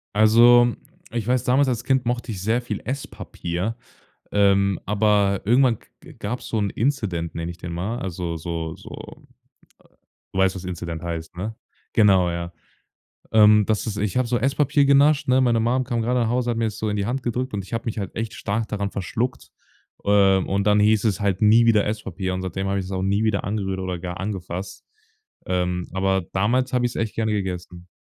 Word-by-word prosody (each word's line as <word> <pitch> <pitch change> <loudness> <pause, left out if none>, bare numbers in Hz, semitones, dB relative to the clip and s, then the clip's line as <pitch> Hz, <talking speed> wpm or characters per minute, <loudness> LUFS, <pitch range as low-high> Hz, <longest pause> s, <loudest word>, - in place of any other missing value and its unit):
Also, 120 +2 +6 0.4
ich 115 -2 -3
weiß, 125 0 +2
damals 135 +2 +3
als 120 -2 -1
Kind 130 0 +1
mochte 120 0 -2
ich 95 - -6
sehr 110 +5 +1
viel 110 -4 -5
Esspapier. 110 -6 -4 0.6
Ähm, 100 -2 +3
aber 100 -1 +2
k - - -23
k - - -17
irgendwann 125 -1 +4 0.4
gab's 115 +4 -4
so 115 - -2
'n 100 - 0
Incident, 100 - -1
nenne 85 0 -3
ich 85 - -12
den 85 -1 -7
mal. 100 +7 -3
Also, 90 -4 -4
so 80 0 -4
so, - - -13 0.9
äh - - -26 0.4
du 95 - -4
weißt, 95 0 +3
was 95 - -7
Incident 85 -2 -5
heißt, 85 -1 -5
ne? 105 +5 -4 0.4
Genau, 95 -5 +4
ja, 85 0 -4 0.8
ähm, 105 -1 +6
das 110 +1 -1
ist 105 - -3
ich 105 0 -2
habe 130 - +1
so 120 +1 +1
Esspapier 140 +2 +2
genascht, 140 +2 +4
ne? 130 0 +4
Meine 120 -3 +3
Mom 125 +3 +1
kam 120 -2 -2
grade 125 +2 +1
nach 115 - +1
Hause, 120 0 0
hat 115 - -3
mir 115 - +1
das 110 -1 -3
so 110 - -2
in 105 - -1
die 100 - -1
Hand 125 +3 -2
gedrückt 125 +2 -2
und 100 -2 -3
ich - - -11
habe 115 - -3
mich 115 -2 -3
halt 100 - -6
echt 115 0 -3
stark 110 +2 -2
daran 100 -1 -2
verschluckt. 115 +7 -3 0.5
Ähm, 100 -2 +4
und 100 +1 0
dann 105 0 +4
hieß 105 0 +3
es 100 -6 +1
halt 100 -2 0
nie 110 +2 +6
wieder 110 -3 +4
Esspapier 95 -3 -3
und 90 - -3
seitdem 95 +1 -3
habe 100 0 0
ich's 95 0 -6
auch 95 -1 -2
nie 100 +3 +1
wieder 105 -2 0
angerührt 100 -2 -2
oder 90 -2 -3
gar 90 0 -6
angefasst, 95 -1 -5 0.6
ähm, 90 -1 -1
aber 95 0 +1
damals 125 +7 +1
habe 125 -1 +2
ich's 120 - -2
echt 110 -2 -2
gerne 110 -1 0
gegessen. 90 -3 -5
105 Hz, 205 wpm, -23 LUFS, 95-120 Hz, 0.9 s, Also